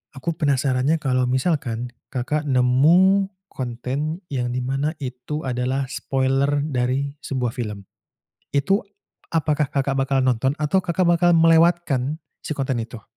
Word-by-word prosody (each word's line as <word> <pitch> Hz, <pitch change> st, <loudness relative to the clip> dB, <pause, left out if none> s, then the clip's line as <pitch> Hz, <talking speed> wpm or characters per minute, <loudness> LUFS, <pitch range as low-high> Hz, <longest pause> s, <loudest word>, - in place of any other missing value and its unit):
aku 165 Hz, +5 st, -3 dB
penasarannya, 140 Hz, -1 st, +1 dB
kalau 130 Hz, -4 st, 0 dB
misalkan 125 Hz, -4 st, -1 dB, 0.2 s
Kakak 150 Hz, +4 st, -2 dB
nemu 165 Hz, +11 st, +4 dB, 0.2 s
konten 130 Hz, +6 st, -4 dB
yang 125 Hz, -2 st, -1 dB
di 125 Hz, -, -2 dB
mana 135 Hz, +5 st, -1 dB
itu 130 Hz, +3 st, -5 dB
adalah 130 Hz, +2 st, -1 dB
spoiler 135 Hz, +2 st, 0 dB
dari 135 Hz, 0 st, -1 dB
sebuah 125 Hz, -3 st, -2 dB
film, 105 Hz, -5 st, -5 dB, 0.7 s
itu 145 Hz, +9 st, +2 dB, 0.5 s
apakah 150 Hz, -2 st, +1 dB
Kakak 135 Hz, -1 st, 0 dB
bakal 135 Hz, 0 st, +1 dB
nonton 130 Hz, +1 st, +1 dB
atau 150 Hz, +6 st, +2 dB
Kakak 175 Hz, +1 st, +1 dB
bakal 175 Hz, 0 st, +4 dB
melewatkan 165 Hz, -4 st, +3 dB, 0.2 s
si -, -, -3 dB
konten 135 Hz, -3 st, -1 dB
itu? 115 Hz, -2 st, -11 dB
135 Hz, 130 wpm, -22 LUFS, 125-155 Hz, 0.7 s, nemu